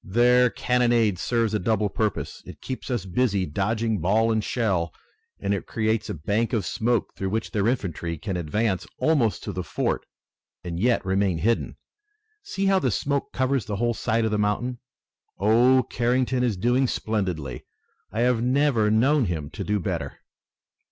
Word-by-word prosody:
"Their 125 Hz, +4 st, +4 dB
cannonade 120 Hz, -6 st, +2 dB
serves 115 Hz, -1 st, 0 dB
a 105 Hz, -, +1 dB
double 105 Hz, +2 st, +1 dB
purpose. 105 Hz, 0 st, -2 dB
It -, -, -10 dB
keeps 130 Hz, +1 st, -6 dB
us 120 Hz, -7 st, -2 dB
busy 100 Hz, 0 st, +1 dB
dodging 110 Hz, +6 st, -1 dB
ball 110 Hz, +7 st, +2 dB
and 110 Hz, -1 st, +1 dB
shell, 95 Hz, -10 st, 0 dB, 0.5 s
and 100 Hz, 0 st, -1 dB
it 100 Hz, -, -3 dB
creates 110 Hz, 0 st, -1 dB
a -, -, -3 dB
bank 105 Hz, -, -1 dB
of 105 Hz, -6 st, 0 dB
smoke 115 Hz, +3 st, 0 dB
through 95 Hz, -, -3 dB
which 110 Hz, +2 st, -2 dB
their 105 Hz, -2 st, +1 dB
infantry 85 Hz, -, -2 dB
can 95 Hz, +4 st, -4 dB
advance 95 Hz, +4 st, -1 dB
almost 140 Hz, -9 st, +1 dB
to 105 Hz, -, -4 dB
the 90 Hz, -, -3 dB
fort -, -, -2 dB, 0.6 s
and 85 Hz, -1 st, -4 dB
yet 120 Hz, 0 st, +2 dB
remain 95 Hz, -2 st, +1 dB
hidden. 115 Hz, +7 st, 0 dB, 0.6 s
See 195 Hz, -, -3 dB
how 195 Hz, -1 st, +4 dB
the 130 Hz, -, +1 dB
smoke 140 Hz, +5 st, -1 dB
covers 130 Hz, -3 st, 0 dB
the 105 Hz, -, -3 dB
whole 120 Hz, +3 st, +1 dB
side 115 Hz, 0 st, 0 dB
of 110 Hz, -, 0 dB
the 105 Hz, -, 0 dB
mountain. 120 Hz, +4 st, -1 dB, 0.6 s
Oh, 120 Hz, +5 st, +4 dB
Carrington 125 Hz, +1 st, +1 dB
is 120 Hz, -6 st, 0 dB
doing 125 Hz, +6 st, +2 dB
splendidly! 90 Hz, -, -3 dB, 0.4 s
I 115 Hz, -, -1 dB
have 125 Hz, -1 st, +2 dB
never 125 Hz, -3 st, +2 dB
known 130 Hz, +5 st, +3 dB
him 80 Hz, -5 st, -3 dB
to 100 Hz, -, -5 dB
do 105 Hz, +1 st, 0 dB
better!" 85 Hz, -7 st, -3 dB
110 Hz, 170 wpm, -25 LUFS, 95-125 Hz, 0.6 s, Their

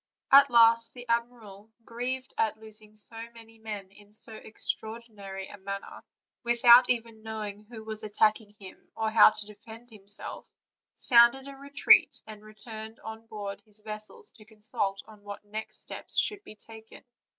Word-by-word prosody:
At 280 Hz, +1 st, +8 dB
last 230 Hz, -1 st, +5 dB
the 245 Hz, 0 st, -11 dB
admiral, 230 Hz, -3 st, -3 dB, 0.2 s
grieved 255 Hz, +2 st, -5 dB
at 220 Hz, -1 st, 0 dB
losing 215 Hz, -1 st, -7 dB
so 225 Hz, +2 st, -1 dB
many 225 Hz, -1 st, -15 dB
men 210 Hz, -3 st, -7 dB
in 205 Hz, +1 st, -19 dB
so 220 Hz, +1 st, -2 dB
ex 215 Hz, -, +1 dB
traordinary 210 Hz, -4 st, -9 dB
a 205 Hz, -, -12 dB
manner, 195 Hz, +1 st, -7 dB, 0.4 s
without 240 Hz, +1 st, +6 dB
even 230 Hz, -2 st, -2 dB
knowing 215 Hz, -1 st, -7 dB
who 220 Hz, 0 st, -11 dB
was 220 Hz, -1 st, -4 dB
attacking 215 Hz, 0 st, +1 dB
him, 190 Hz, -2 st, -14 dB
or 220 Hz, 0 st, -1 dB
how 220 Hz, -1 st, +8 dB
to 215 Hz, -, -4 dB
defend 225 Hz, +3 st, -13 dB
himself, 205 Hz, -1 st, -6 dB, 0.5 s
sounded 240 Hz, +2 st, +5 dB
a 275 Hz, -, -9 dB
re 280 Hz, +1 st, -13 dB
treat, 280 Hz, 0 st, +5 dB
and 215 Hz, -1 st, -11 dB
returned 220 Hz, +1 st, -10 dB
on 220 Hz, +1 st, -9 dB
board 200 Hz, -2 st, -7 dB
his 210 Hz, 0 st, -11 dB
vessels 215 Hz, -, -4 dB
to 220 Hz, -, -18 dB
consult 210 Hz, -2 st, -2 dB
on 215 Hz, -2 st, -16 dB
what 205 Hz, 0 st, -9 dB, 0.3 s
steps -, -, -4 dB
should 415 Hz, -1 st, +2 dB
next 400 Hz, -, -44 dB
be 215 Hz, -, -11 dB
taken. 220 Hz, +1 st, -13 dB
220 Hz, 160 wpm, -28 LUFS, 210-235 Hz, 0.5 s, At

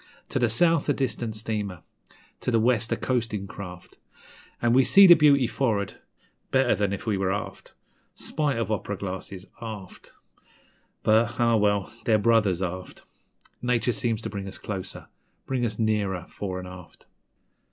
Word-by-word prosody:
To -, -, -1 dB
the 120 Hz, -2 st, +2 dB
south 165 Hz, +6 st, +3 dB
a -, -, +4 dB
distant 120 Hz, -5 st, -2 dB
steamer, 105 Hz, -4 st, -4 dB, 0.6 s
to -, -, -3 dB
the 115 Hz, -2 st, +3 dB
west 115 Hz, -1 st, +1 dB
a -, -, +1 dB
coastin' 115 Hz, -6 st, -1 dB
craft, 90 Hz, -2 st, -10 dB, 0.6 s
An' 120 Hz, 0 st, +2 dB
we 130 Hz, +1 st, +6 dB
see 195 Hz, +11 st, +7 dB
the 175 Hz, -, +11 dB
beauty 145 Hz, -5 st, +5 dB
for'ard, 110 Hz, -6 st, -1 dB, 0.5 s
better 135 Hz, 0 st, +3 dB
than 100 Hz, -2 st, 0 dB
if 100 Hz, -, -5 dB
we 105 Hz, -4 st, 0 dB
were 95 Hz, -1 st, +1 dB
aft; 100 Hz, -, -5 dB, 0.4 s
Spite 145 Hz, -5 st, -2 dB
of 115 Hz, -2 st, -2 dB
op'ra 105 Hz, -1 st, -2 dB
glasses, 95 Hz, 0 st, -6 dB, 0.2 s
aft; 105 Hz, -5 st, -9 dB, 0.9 s
But, 110 Hz, +2 st, +2 dB
ah 115 Hz, -1 st, +4 dB
well, 105 Hz, -1 st, +1 dB
they're 110 Hz, -2 st, +4 dB
brothers 105 Hz, -4 st, +2 dB
aft 90 Hz, 0 st, -6 dB, 0.6 s
Nature 125 Hz, -1 st, +1 dB
seems 115 Hz, 0 st, -1 dB
to -, -, -5 dB
draw 100 Hz, -, -5 dB
us 95 Hz, 0 st, -7 dB
closer 95 Hz, -2 st, -6 dB, 0.4 s
bring 125 Hz, -2 st, 0 dB
us 105 Hz, -1 st, -5 dB
nearer 105 Hz, -5 st, 0 dB
fore 95 Hz, -2 st, -5 dB
'n' 90 Hz, -, -8 dB
aft. 90 Hz, -2 st, -12 dB
110 Hz, 160 wpm, -26 LUFS, 100-120 Hz, 0.9 s, the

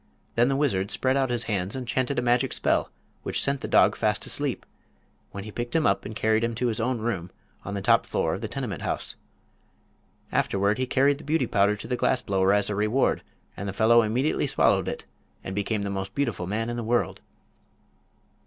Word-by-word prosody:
Then 120 Hz, +1 st, +3 dB
the 135 Hz, -, +1 dB
wizard 100 Hz, -9 st, +1 dB
spread 130 Hz, 0 st, +1 dB
out 135 Hz, -2 st, +1 dB
his 120 Hz, -1 st, 0 dB
hands 100 Hz, -2 st, -2 dB
and 130 Hz, -2 st, -5 dB
chanted 130 Hz, +3 st, 0 dB
a 120 Hz, -, +1 dB
magic 125 Hz, +1 st, +2 dB
spell -, -, +1 dB, 0.3 s
which -, -, -2 dB
sent 140 Hz, -1 st, +1 dB
the -, -, -4 dB
dog -, -, +4 dB
fast -, -, 0 dB
asleep, -, -, -2 dB, 0.7 s
when 100 Hz, -, -6 dB
he 110 Hz, -, -8 dB
picked 120 Hz, +4 st, -4 dB
him 160 Hz, -2 st, +3 dB
up 100 Hz, -, +2 dB
and 105 Hz, -, -6 dB
carried 110 Hz, +1 st, +2 dB
him 115 Hz, 0 st, -1 dB
to 125 Hz, +1 st, 0 dB
his 110 Hz, -, -2 dB
own 125 Hz, +2 st, 0 dB
room 110 Hz, -6 st, -3 dB, 0.3 s
on 100 Hz, -, -5 dB
the 100 Hz, -, -4 dB
top -, -, +4 dB
floor -, -, 0 dB
of 95 Hz, -, -4 dB
the 110 Hz, -, -3 dB
tenement 120 Hz, -6 st, -4 dB
house. -, -, -2 dB, 1.2 s
Afterward 100 Hz, +3 st, +1 dB
he 130 Hz, -, 0 dB
carried 140 Hz, +2 st, +2 dB
the -, -, -11 dB
Beauty 155 Hz, +3 st, +1 dB
Powder 100 Hz, 0 st, +2 dB
to 105 Hz, -, -8 dB
the 125 Hz, -, 0 dB
glass 125 Hz, 0 st, +1 dB
blower 95 Hz, -1 st, +2 dB
as 105 Hz, 0 st, +3 dB
a 105 Hz, -, -1 dB
reward, 105 Hz, +6 st, +1 dB, 0.3 s
and 100 Hz, +1 st, -5 dB
the -, -, -4 dB
fellow 115 Hz, +3 st, +5 dB
immediately 120 Hz, +7 st, 0 dB
swallowed -, -, +2 dB
it -, -, -4 dB, 0.4 s
and 95 Hz, -, -5 dB
became 100 Hz, +1 st, -1 dB
the 100 Hz, -, -3 dB
most 95 Hz, 0 st, -4 dB
beautiful 140 Hz, -10 st, -1 dB
man 115 Hz, +4 st, -2 dB
in 120 Hz, -, -4 dB
the 120 Hz, -, -3 dB
world. 120 Hz, +2 st, 0 dB
115 Hz, 215 wpm, -26 LUFS, 100-125 Hz, 1.2 s, fellow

